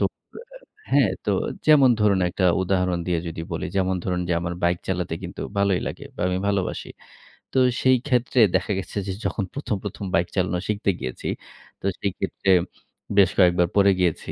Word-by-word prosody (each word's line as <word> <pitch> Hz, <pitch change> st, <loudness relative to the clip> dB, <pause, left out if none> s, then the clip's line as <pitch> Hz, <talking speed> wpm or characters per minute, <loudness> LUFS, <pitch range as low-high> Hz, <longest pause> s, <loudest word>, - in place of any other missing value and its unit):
তো -, -, +3 dB, 0.9 s
হ্যাঁ, -, -, +4 dB, 0.2 s
তো -, -, +2 dB, 0.4 s
যেমন 140 Hz, -4 st, +7 dB
ধরুন, 105 Hz, -2 st, +4 dB
একটা 95 Hz, -, -1 dB, 0.2 s
উদাহরণ 90 Hz, -1 st, 0 dB
দিয়ে 90 Hz, -2 st, +1 dB
যদি 80 Hz, -, -6 dB
বলি, -, -, -3 dB
যেমন 95 Hz, -1 st, +1 dB
ধরুন, 90 Hz, -1 st, -1 dB
যে -, -, +1 dB
আমার 85 Hz, 0 st, -3 dB
বাইক 85 Hz, 0 st, +2 dB
চালাতে 90 Hz, -3 st, -1 dB
কিন্তু 90 Hz, -, -7 dB, 0.2 s
ভালোই 100 Hz, -2 st, +2 dB
লাগে। -, -, -8 dB
বা -, -, -7 dB
আমি 90 Hz, -, 0 dB
ভালোবাসি। 95 Hz, -2 st, -2 dB, 0.7 s
তো -, -, 0 dB, 0.2 s
সেই 130 Hz, 0 st, +5 dB
ক্ষেত্রে 125 Hz, -1 st, +1 dB, 0.2 s
দেখা 95 Hz, +3 st, 0 dB
গেছে 95 Hz, -, -7 dB
যে 95 Hz, -, -2 dB
যখন 105 Hz, -, -1 dB
১ম, 140 Hz, -6 st, -2 dB
১ম, 100 Hz, 0 st, -5 dB
বাইক 85 Hz, +1 st, +2 dB
চালানো 90 Hz, -2 st, 0 dB
শিখতে 105 Hz, -1 st, 0 dB
গিয়েছি, 65 Hz, -1 st, -5 dB, 0.5 s
তো -, -, -8 dB
সেই 100 Hz, -, -1 dB
ক্ষেত্রে 95 Hz, 0 st, -2 dB, 0.7 s
বেশ 95 Hz, -3 st, +6 dB
কয়েকবার 90 Hz, -1 st, +5 dB
পড়ে 100 Hz, -1 st, +5 dB
গিয়েছি। 90 Hz, -3 st, 0 dB
95 Hz, 175 wpm, -24 LUFS, 90-100 Hz, 0.9 s, যেমন